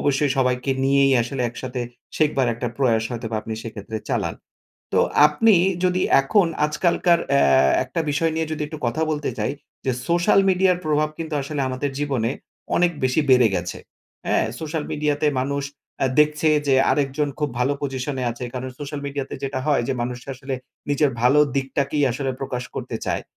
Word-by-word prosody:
অবশ্যই 145 Hz, 0 st, +1 dB
সবাইকে 125 Hz, 0 st, +1 dB
নিয়েই 135 Hz, 0 st, +4 dB
আসলে 125 Hz, +2 st, -3 dB
একসাথে 125 Hz, +1 st, -6 dB, 0.4 s
শেখবার 145 Hz, -4 st, +2 dB
একটা 120 Hz, +1 st, -3 dB
প্রয়াস 115 Hz, -5 st, +2 dB
হয়তোবা 115 Hz, -2 st, -4 dB
আপনি 110 Hz, -, -6 dB
সেক্ষেত্রে 110 Hz, -1 st, -6 dB
চালান। -, -, -1 dB, 0.6 s
তো -, -, +4 dB, 0.3 s
আপনি 205 Hz, +9 st, +4 dB, 0.3 s
যদি 180 Hz, 0 st, +2 dB, 0.2 s
এখন 185 Hz, +7 st, +3 dB, 0.2 s
আজকালকার 170 Hz, +2 st, +2 dB
অ্যা 140 Hz, 0 st, +4 dB, 0.4 s
একটা 135 Hz, +6 st, -3 dB
বিষয় 160 Hz, +3 st, +1 dB
নিয়ে 160 Hz, 0 st, -1 dB
যদি 155 Hz, -1 st, -3 dB
একটু 155 Hz, +1 st, -8 dB
কথা 155 Hz, +7 st, -1 dB
বলতে 150 Hz, -1 st, -1 dB
চাই, -, -, 0 dB, 0.3 s
যে 130 Hz, -, +1 dB, 0.2 s
সোশ্যাল 175 Hz, +3 st, +4 dB
মিডিয়ার 185 Hz, -1 st, +3 dB
প্রভাব 150 Hz, 0 st, +1 dB
কিন্তু 160 Hz, -2 st, -4 dB
আসলে 140 Hz, +1 st, -4 dB
আমাদের 130 Hz, +2 st, -2 dB
জীবনে 135 Hz, -6 st, 0 dB, 0.5 s
অনেক 175 Hz, 0 st, +3 dB
বেশি 130 Hz, +4 st, +2 dB
বেড়ে 125 Hz, -3 st, +6 dB
গেছে, 90 Hz, -1 st, -3 dB, 0.5 s
হ্যাঁ? -, -, +2 dB
সোশ্যাল 155 Hz, -1 st, -3 dB
মিডিয়াতে 150 Hz, 0 st, +1 dB
মানুষ 140 Hz, +2 st, -1 dB, 0.4 s
আ -, -, +4 dB
দেখছে 150 Hz, +1 st, +2 dB, 0.2 s
যে, 135 Hz, -, +4 dB, 0.2 s
আরেকজন 145 Hz, +1 st, 0 dB
খুব 150 Hz, -2 st, -1 dB
ভালো 130 Hz, +3 st, +2 dB
পজিশনে 135 Hz, -1 st, -3 dB
আছে। 120 Hz, +2 st, -6 dB
কারণ 130 Hz, +1 st, -4 dB
সোশ্যাল 145 Hz, 0 st, -5 dB
মিডিয়াতে 140 Hz, -1 st, -4 dB
যেটা 135 Hz, -1 st, -2 dB
হয় 145 Hz, -5 st, +3 dB
যে, -, -, +2 dB
মানুষ 125 Hz, 0 st, -3 dB
আসলে 130 Hz, +1 st, -5 dB, 0.4 s
নিজের 145 Hz, 0 st, +3 dB
ভালো 130 Hz, +4 st, +5 dB, 0.2 s
দিকটাকেই 140 Hz, +2 st, 0 dB
আসলে 135 Hz, +2 st, -2 dB
প্রকাশ 125 Hz, -2 st, -3 dB
করতে -, -, -4 dB
চায়। -, -, -1 dB
140 Hz, 165 wpm, -22 LUFS, 130-150 Hz, 0.6 s, বেড়ে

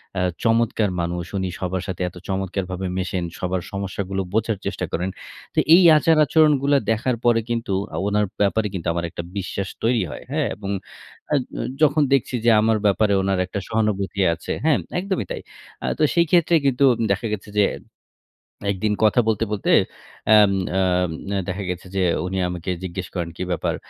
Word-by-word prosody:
অ্যা 90 Hz, -, 0 dB, 0.2 s
চমৎকার 115 Hz, -2 st, +2 dB
মানুষ। 85 Hz, 0 st, -3 dB
উনি 95 Hz, -1 st, -1 dB
সবার 95 Hz, -1 st, -2 dB
সাথে 95 Hz, -2 st, -5 dB
এত -, -, -21 dB
চমৎকারভাবে 95 Hz, -1 st, -3 dB
মেশেন 95 Hz, -1 st, -2 dB, 0.2 s
সবার 90 Hz, 0 st, -1 dB
সমস্যাগুলো 100 Hz, 0 st, -3 dB
বোঝার 110 Hz, -1 st, +1 dB
চেষ্টা -, -, -2 dB
করেন। 90 Hz, +3 st, -1 dB, 0.4 s
তো -, -, +1 dB, 0.2 s
এই 185 Hz, -, +6 dB
আচার-আচরণগুলা 150 Hz, -2 st, +4 dB
দেখার 120 Hz, +3 st, 0 dB
পরে 120 Hz, -1 st, +5 dB
কিন্তু 115 Hz, -4 st, -2 dB, 0.2 s
আ -, -, -3 dB
উনার 105 Hz, 0 st, +2 dB, 0.2 s
ব্যাপারে 105 Hz, +1 st, +2 dB
কিন্তু 90 Hz, -2 st, -4 dB
আমার 85 Hz, 0 st, -2 dB
একটা 85 Hz, -, -6 dB
বিশ্বাস 95 Hz, 0 st, -3 dB
তৈরি 115 Hz, -3 st, +2 dB
হয়। -, -, -8 dB
হ্যাঁ, 150 Hz, -3 st, 0 dB
এবং 100 Hz, -1 st, -7 dB, 0.6 s
আ -, -, +5 dB
জ -, -, -5 dB, 0.4 s
যখন 155 Hz, 0 st, +4 dB
দেখছি 130 Hz, -1 st, +1 dB
যে -, -, +6 dB
আমার 110 Hz, 0 st, +3 dB
ব্যাপারে 100 Hz, +1 st, +3 dB
উনার 95 Hz, -1 st, 0 dB
একটা 100 Hz, +2 st, -4 dB
সহানুভূতি 105 Hz, -3 st, -1 dB
আছে, 85 Hz, -, -6 dB
হ্যাঁ, 160 Hz, -2 st, +4 dB, 0.2 s
একদমই 190 Hz, -, -2 dB
তাই। -, -, -4 dB, 0.4 s
আ -, -, -2 dB
তো -, -, +3 dB
সেই 170 Hz, 0 st, +4 dB
ক্ষেত্রে 170 Hz, -1 st, +4 dB
কিন্তু 135 Hz, 0 st, +3 dB, 0.3 s
দেখা 100 Hz, +3 st, 0 dB
গেছে 105 Hz, +1 st, -14 dB
যে 100 Hz, -, +6 dB, 1.1 s
১ -, -, -6 dB
দিন 105 Hz, -, +2 dB
কথা 110 Hz, +3 st, +4 dB
বলতে, 110 Hz, 0 st, +1 dB
বলতে 100 Hz, -, -1 dB, 0.6 s
অ্যাম 105 Hz, -2 st, +7 dB, 0.3 s
আ -, -, +3 dB, 0.7 s
দেখা 95 Hz, +2 st, -3 dB
গেছে 90 Hz, +1 st, -5 dB
যে 95 Hz, -, +2 dB, 0.2 s
উনি 95 Hz, +1 st, -3 dB
আমাকে 90 Hz, +1 st, -4 dB
জিজ্ঞেস 90 Hz, 0 st, -5 dB
করেন, 85 Hz, -2 st, -3 dB
"কি -, -, -4 dB
ব্যাপার 85 Hz, -, -1 dB
100 Hz, 175 wpm, -22 LUFS, 95-115 Hz, 1.1 s, অ্যাম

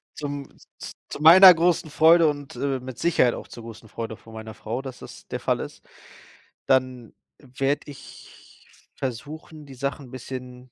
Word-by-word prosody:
zum 145 Hz, -2 st, -5 dB, 0.3 s
z -, -, -8 dB, 0.2 s
zu -, -, -7 dB
meiner 180 Hz, +3 st, +10 dB
großen 170 Hz, -1 st, +1 dB
Freude 160 Hz, +2 st, +6 dB
und, 145 Hz, -3 st, -4 dB
äh, 135 Hz, +1 st, -2 dB
mit 130 Hz, -1 st, -9 dB
Sicherheit 160 Hz, -8 st, +2 dB
auch -, -, -9 dB
zur 120 Hz, -, -11 dB
großen 115 Hz, -1 st, -11 dB
Freude 110 Hz, 0 st, -6 dB
von 115 Hz, -, -16 dB
meiner 110 Hz, 0 st, -8 dB
Frau, 115 Hz, +6 st, -5 dB
dass 130 Hz, -2 st, -9 dB
das -, -, -12 dB
der -, -, -5 dB
Fall -, -, 0 dB
ist. -, -, -9 dB, 0.8 s
Dann 130 Hz, -3 st, 0 dB, 0.3 s
werde 135 Hz, +2 st, -3 dB
ich 140 Hz, -, -17 dB
versuchen, 150 Hz, +5 st, -7 dB
die 135 Hz, -, -12 dB
Sachen 140 Hz, +1 st, -4 dB
'n 120 Hz, -, -16 dB
bisschen 125 Hz, 0 st, -9 dB
135 Hz, 170 wpm, -24 LUFS, 125-150 Hz, 0.8 s, meiner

